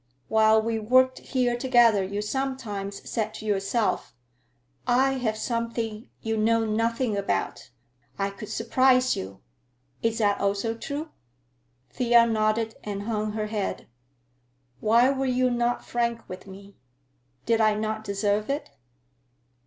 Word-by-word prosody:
While 220 0 +4
we 225 0 -1
worked 255 +4 +3
here 250 -2 0
together 240 -5 +4
you 200 +2 -3
sometimes 210 -6 -4
said 220 -2 -2
to 215 - -8
yourself, 205 - 0 0.7
'I 260 +2 +4
have 220 -3 -1
something 230 -1 -3
you 225 0 -1
know 225 +1 +2
nothing 230 +1 0
about; 200 -9 -2 0.5
I 200 0 -1
could 205 +1 -9
surprise 255 +3 +3
you.' 95 0 -7 0.6
Is 225 0 0
that 205 -2 +1
also 200 +3 0
true?" 285 +7 -5 0.8
Thea 240 -2 +4
nodded 220 0 0
and 200 -1 -4
hung 215 -1 -2
her 215 -1 -2
head. 210 -2 -3 0.9
"Why 235 - +4
were 270 -1 -1
you 255 0 +2
not 240 0 0
frank 235 -1 -2
with 185 +2 -9
me? 195 +1 -13 0.7
Did 225 -1 +2
I 215 -1 +4
not 215 0 -2
deserve 205 +1 -1
it?" 280 - -3
225 Hz, 130 wpm, -26 LUFS, 210-240 Hz, 0.9 s, While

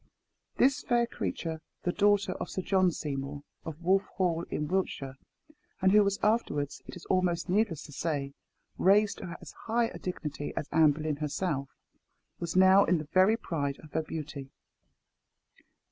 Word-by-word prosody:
This 265 +1 +3
fair 240 -1 +2
creature, 165 -8 -4 0.2
the 175 - +1
daughter 205 +1 +3
of - - -5
Sir 185 - -4
John 185 -1 +3
Seymour, 140 -2 -4 0.2
of 160 +1 -8
Wolff 190 +3 +3
Hall, 175 -3 +1
in 150 - -2
Wiltshire, 145 -7 -2 0.6
and 190 0 +4
who 210 +1 +7
was 200 0 0
afterwards, 210 -10 0
it - - -8
is 180 - -11
almost 180 -1 0
needless 190 -5 +1
to - - -11
say, 140 -2 -2 0.5
raised 200 +2 +4
to 170 -1 -7
as - - -11 0.2
high 230 +1 +2
a - - -9
dignity 150 -5 -5
as 150 - -2
Anne 155 -2 +5
Boleyn 155 -1 -3
herself, 150 -2 -2 0.7
was 170 - -4
now 190 +1 +7
in 180 - +2
the 155 -1 -6
very 190 +4 +5
pride 140 -9 -3
of 155 - -13
her 160 - 0
beauty. 150 -3 -6
170 Hz, 160 wpm, -30 LUFS, 150-195 Hz, 0.7 s, who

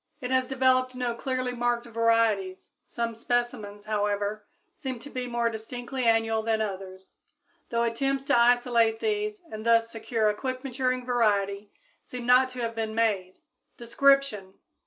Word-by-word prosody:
It 250 -2 -5
has 260 -1 +2
developed 255 -1 +2
no 250 -2 -1
clearly 255 +1 -2
marked 240 -1 -1
varieties; 230 -5 +1 0.2
some 235 -1 -3
specimens, 230 -3 -2
however, 205 0 -1 0.3
seem 260 -3 -5
to 285 +5 -12
be 255 -1 -4
more 235 -1 0
distinctly 245 +3 -5
annual 225 -1 +2
than 220 0 0
others, 190 -2 -6 0.6
though 235 0 +1
attempts 270 +4 0
to - - +2
isolate 235 -2 +3
these 420 -2 -2
and 215 0 -6
thus 230 0 +3
secure 225 -1 -1
a 210 - +3
quick 255 +3 -4
maturing 255 -1 -1
variety 205 -4 0 0.3
seem 250 -1 -8
not 250 +1 +5
to 255 -1 -7
have 230 -1 -2
been 220 -1 -3
made. 200 -5 0 0.4
_Description. 240 -5 +2
235 Hz, 150 wpm, -27 LUFS, 220-255 Hz, 0.6 s, not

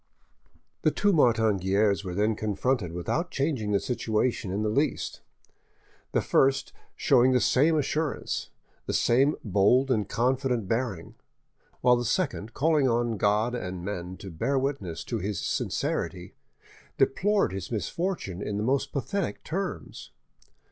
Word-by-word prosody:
The - - +4
two 205 -1 +2
Martin 115 - +3
Guerres 100 +2 +2
were 90 -2 -5
then 105 +2 +1
confronted 110 -1 -1
without 120 - -2
changing 135 -7 -1
the 100 - +3
situation 115 -3 -1
in 100 +3 -1
the 105 - +1
least; 140 +5 -1 0.9
the - - +1
first 135 0 +2 0.2
showing 130 +2 +4
the 125 - +4
same 155 +6 +3
assurance, 150 +1 -2 0.4
the - - -1
same 135 +5 +3
bold 110 +6 +3
and 110 -5 0
confident 125 -3 0
bearing; 115 -6 -2 0.7
while 125 0 +5
the 120 - -2
second, 110 -1 -1
calling 150 -2 +3
on 120 -1 0
God 105 +4 +2
and 90 -6 -5
men 90 -2 -5
to 95 - -9
bear 135 +12 -1
witness 130 - -2
to 115 - -3
his 100 +1 -3
sincerity, 90 +1 -2 0.6
deplored 200 - +2
his 95 -2 -5
misfortune 110 - -3
in 105 -1 -3
the 105 - -1
most 130 +4 0
pathetic 190 +6 -3
terms. 190 +3 -5
115 Hz, 140 wpm, -27 LUFS, 100-135 Hz, 0.9 s, while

